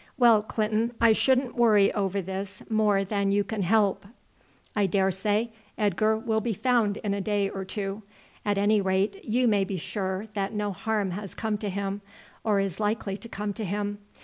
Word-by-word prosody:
Well, 235 Hz, -4 st, +6 dB
Clinton, 220 Hz, +2 st, -1 dB
I 230 Hz, -1 st, +6 dB
shouldn't 255 Hz, +3 st, +2 dB
worry 215 Hz, -4 st, +4 dB
over 195 Hz, -1 st, -1 dB
this 190 Hz, +2 st, -6 dB
more 210 Hz, -2 st, +3 dB
than 200 Hz, 0 st, 0 dB
you 205 Hz, +1 st, +3 dB
can 215 Hz, 0 st, -3 dB
help. 200 Hz, 0 st, +2 dB, 0.7 s
I 205 Hz, -2 st, +3 dB
daresay 200 Hz, +4 st, +1 dB, 0.3 s
Edgar 215 Hz, +1 st, +2 dB
will 220 Hz, -1 st, 0 dB
be 230 Hz, 0 st, -1 dB
found 225 Hz, -2 st, +1 dB
in 205 Hz, -2 st, -2 dB
a 200 Hz, -, -2 dB
day 200 Hz, -1 st, 0 dB
or 195 Hz, -, -4 dB
two. 195 Hz, +1 st, -4 dB, 0.4 s
At 205 Hz, -1 st, 0 dB
any 205 Hz, +1 st, +3 dB
rate 195 Hz, +1 st, 0 dB
you 245 Hz, +3 st, +1 dB
may 205 Hz, -3 st, +3 dB
be 195 Hz, 0 st, -3 dB
sure 190 Hz, +3 st, -3 dB
that 200 Hz, 0 st, -2 dB
no 210 Hz, -1 st, -1 dB
harm 210 Hz, 0 st, -1 dB
has 200 Hz, +1 st, -6 dB
come 220 Hz, -2 st, -2 dB
to 210 Hz, -, -3 dB
him, 200 Hz, +1 st, -3 dB, 0.4 s
or 210 Hz, -2 st, +2 dB
is 195 Hz, -2 st, -2 dB
likely 210 Hz, -2 st, -1 dB
to 230 Hz, -, -11 dB
come 205 Hz, -1 st, -3 dB
to 220 Hz, -, -4 dB
him. 205 Hz, +1 st, -2 dB
205 Hz, 185 wpm, -27 LUFS, 195-220 Hz, 0.7 s, Well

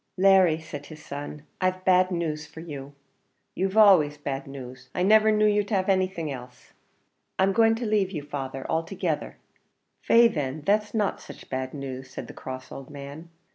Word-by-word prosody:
"Larry," 185 Hz, -4 st, +5 dB
said 145 Hz, -3 st, -8 dB
his 155 Hz, -1 st, -12 dB
son, 145 Hz, +1 st, -7 dB, 0.2 s
"I've 185 Hz, 0 st, 0 dB
bad 185 Hz, 0 st, +5 dB
news 160 Hz, -4 st, -3 dB
for 155 Hz, -, -12 dB
you." 145 Hz, -4 st, -8 dB, 0.6 s
"You've 190 Hz, +3 st, -1 dB
always 180 Hz, -9 st, +6 dB
bad 140 Hz, -2 st, -4 dB
news. 130 Hz, -1 st, -10 dB
I 180 Hz, -, +1 dB
niver 215 Hz, +2 st, +6 dB
knew 215 Hz, 0 st, +3 dB
you 210 Hz, 0 st, +3 dB
have 195 Hz, -2 st, 0 dB
anything 185 Hz, -5 st, 0 dB
else." 125 Hz, -1 st, -10 dB, 0.6 s
"I'm 195 Hz, +1 st, +3 dB
going 225 Hz, +1 st, +4 dB
to 235 Hz, +1 st, -4 dB
lave 210 Hz, -3 st, +2 dB
you, 155 Hz, -7 st, -5 dB
father, 135 Hz, -2 st, -5 dB
altogether." 165 Hz, 0 st, -2 dB, 0.6 s
"Faix, 230 Hz, -1 st, +5 dB
then, 145 Hz, -1 st, -3 dB
that's 210 Hz, +2 st, +1 dB
no 210 Hz, -3 st, +1 dB
such -, -, -13 dB
bad 130 Hz, +1 st, -3 dB
news," 130 Hz, -2 st, -6 dB
said -, -, -7 dB
the -, -, -10 dB
cross 130 Hz, 0 st, -8 dB
old 135 Hz, -1 st, -9 dB
man. 145 Hz, +3 st, -9 dB
160 Hz, 175 wpm, -26 LUFS, 140-195 Hz, 0.6 s, always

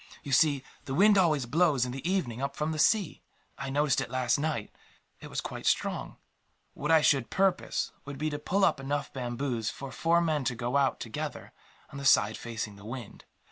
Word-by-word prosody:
You 140 Hz, -, -6 dB
see, 140 Hz, 0 st, +4 dB, 0.2 s
the 135 Hz, -, -3 dB
wind 205 Hz, +4 st, +6 dB
always 155 Hz, -9 st, +3 dB
blows, 145 Hz, -1 st, +2 dB
in 125 Hz, -, -4 dB
the 135 Hz, +7 st, -4 dB
evening, 135 Hz, -11 st, -1 dB
up 140 Hz, 0 st, -2 dB
from 150 Hz, +1 st, -1 dB
the 155 Hz, -, -3 dB
sea. 205 Hz, +2 st, +2 dB, 0.3 s
I 135 Hz, -, -5 dB
noticed 145 Hz, 0 st, +2 dB
it -, -, -4 dB
last 130 Hz, +1 st, +1 dB
night. 150 Hz, -8 st, -2 dB, 0.5 s
It -, -, -9 dB
was -, -, -3 dB
quite -, -, -5 dB
strong. -, -, 0 dB, 0.6 s
What 150 Hz, -, -4 dB
I 160 Hz, -1 st, +6 dB
should 135 Hz, -5 st, +3 dB
propose 195 Hz, -1 st, 0 dB
would 140 Hz, -1 st, -7 dB
be 155 Hz, +2 st, -1 dB
to 145 Hz, -, -3 dB
pull 195 Hz, +6 st, +2 dB
up 155 Hz, -5 st, +2 dB
enough 140 Hz, +1 st, -3 dB
bamboos 120 Hz, -2 st, -2 dB
for 140 Hz, -1 st, -7 dB
four 165 Hz, +4 st, +2 dB
men 155 Hz, -4 st, 0 dB
to 125 Hz, -, 0 dB
go 120 Hz, +2 st, -3 dB
out, 140 Hz, -2 st, +2 dB
together, -, -, -6 dB, 0.4 s
on 140 Hz, -, -7 dB
the 140 Hz, -, -6 dB
side 110 Hz, -5 st, +5 dB
facing 110 Hz, -3 st, -5 dB
the 100 Hz, -, -14 dB
wind. 120 Hz, -1 st, -8 dB
140 Hz, 205 wpm, -29 LUFS, 125-155 Hz, 0.6 s, wind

